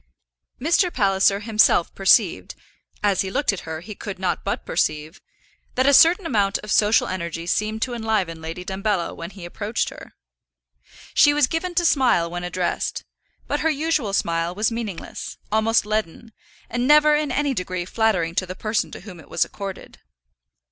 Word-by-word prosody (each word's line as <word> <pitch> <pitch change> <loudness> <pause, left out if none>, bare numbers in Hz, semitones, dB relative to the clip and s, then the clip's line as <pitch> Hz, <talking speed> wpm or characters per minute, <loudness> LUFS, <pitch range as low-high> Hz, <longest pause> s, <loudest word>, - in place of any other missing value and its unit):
Mr. 340 +5 +2
Palliser 195 -3 +2
himself 215 -5 +3
perceived 190 - +2 0.5
as 200 -2 +2
he 190 - -3
looked 240 +2 0
at 175 -4 -7
her 160 0 -5
he 210 +5 -8
could 200 -1 -7
not 185 0 -2
but - - -3
perceive 155 -1 -2 0.5
that 260 - +2
a 280 - +5
certain 340 +6 +6
amount 205 -8 +1
of 210 - -6
social 210 +1 +3
energy 170 -2 -4
seemed 215 +4 -1
to 250 - -3
enliven 215 -8 -1
Lady 165 +3 -6
Dumbello 195 -1 -2
when 170 +1 -7
he 190 -2 -11
approached 210 +6 -2
her. - - -13 1.0
She 290 0 +5
was 295 -2 +4
given 345 +5 -3
to 345 0 +2
smile 245 - +3
when 175 0 -5
addressed, 180 0 -2 0.4
but - - -2
her 320 - +1
usual 305 -7 0
smile 170 -1 0
was 210 +3 0
meaningless, 225 -6 -6
almost 220 +1 +2
leaden, 215 +1 -3 0.3
and 240 +1 -2
never 300 +1 +6
in 295 -2 0
any 285 +1 0
degree 180 -4 -3
flattering 185 -5 0
to 185 +1 -1
the 185 - -6
person 215 +2 -1
to - - -8
whom 185 -3 -11
it 160 - -16
was - - +1
accorded. 195 -2 -8
205 Hz, 170 wpm, -22 LUFS, 180-245 Hz, 1.0 s, certain